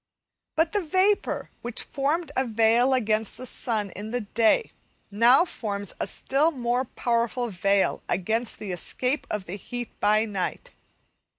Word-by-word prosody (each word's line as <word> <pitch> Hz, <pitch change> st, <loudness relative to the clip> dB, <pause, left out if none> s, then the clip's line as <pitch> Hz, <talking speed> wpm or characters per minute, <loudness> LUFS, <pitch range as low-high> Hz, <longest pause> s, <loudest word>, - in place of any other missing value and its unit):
But 325 Hz, +1 st, +2 dB
the 415 Hz, -, +1 dB
vapour 375 Hz, +5 st, +1 dB
which 240 Hz, -1 st, -3 dB
formed 300 Hz, +5 st, -1 dB
a 260 Hz, -, +2 dB
veil 230 Hz, +2 st, +3 dB
against 220 Hz, -3 st, 0 dB
the 255 Hz, -, -6 dB
sun 220 Hz, -5 st, -2 dB
in 205 Hz, +4 st, -7 dB
the 245 Hz, +2 st, -1 dB
day, 225 Hz, -, +2 dB, 0.4 s
now 235 Hz, -, +5 dB
forms 205 Hz, -, -5 dB
a -, -, -1 dB
still 285 Hz, +4 st, +1 dB
more 250 Hz, -3 st, -1 dB
powerful 235 Hz, 0 st, -1 dB
veil 195 Hz, 0 st, +1 dB
against 220 Hz, +6 st, -1 dB
the 205 Hz, -3 st, -5 dB
escape 250 Hz, -, -1 dB
of 210 Hz, -3 st, -3 dB
the 190 Hz, +3 st, -6 dB
heat 245 Hz, +4 st, -6 dB
by 215 Hz, +1 st, +3 dB
night. 210 Hz, -, -4 dB
235 Hz, 150 wpm, -26 LUFS, 210-265 Hz, 0.4 s, now